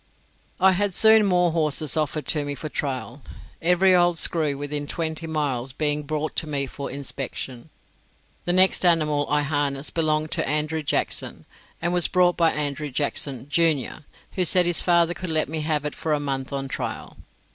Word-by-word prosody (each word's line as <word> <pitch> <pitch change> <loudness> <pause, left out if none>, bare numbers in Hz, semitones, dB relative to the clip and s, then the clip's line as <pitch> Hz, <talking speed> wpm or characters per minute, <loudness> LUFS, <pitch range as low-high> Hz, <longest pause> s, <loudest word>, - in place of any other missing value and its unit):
I 190 +1 +5
had 195 0 -1
soon 220 -1 +6
more 180 -2 +3
horses 155 -3 0
offered 155 -1 -2
to 150 -2 +1
me 145 0 -4
for 155 +3 -6
trial, 135 -2 -4 0.4
every 180 +2 +3
old 175 -1 +3
screw 155 -4 +2
within 145 0 -4
twenty 160 0 -3
miles 135 -5 -2
being 150 +1 -1
brought 155 +1 -4
to 160 - 0
me 140 -2 -1
for 140 +1 -7
inspection. 135 -1 -6 0.8
The 175 - 0
next 185 +1 +4
animal 155 -4 +2
I 150 0 +1
harnessed 145 -1 -1
belonged 155 -1 0
to - - 0
Andrew 155 +2 -1
Jackson, 145 - -1 0.3
and 175 +1 -1
was 175 -1 +6
brought 180 -1 +2
by 165 -1 +3
Andrew 150 0 -3
Jackson, 140 -1 -2
junior, 150 -2 0 0.3
who 185 - 0
said 180 +1 +3
his 175 -1 +2
father 170 -1 +3
could 185 0 -6
let 155 -1 0
me 155 0 -3
have 150 -1 -1
it 150 - -3
for 160 - -2
a 150 - 0
month 135 -2 -4
on 135 -1 -3
trial. - - -6
155 Hz, 180 wpm, -23 LUFS, 145-170 Hz, 0.8 s, soon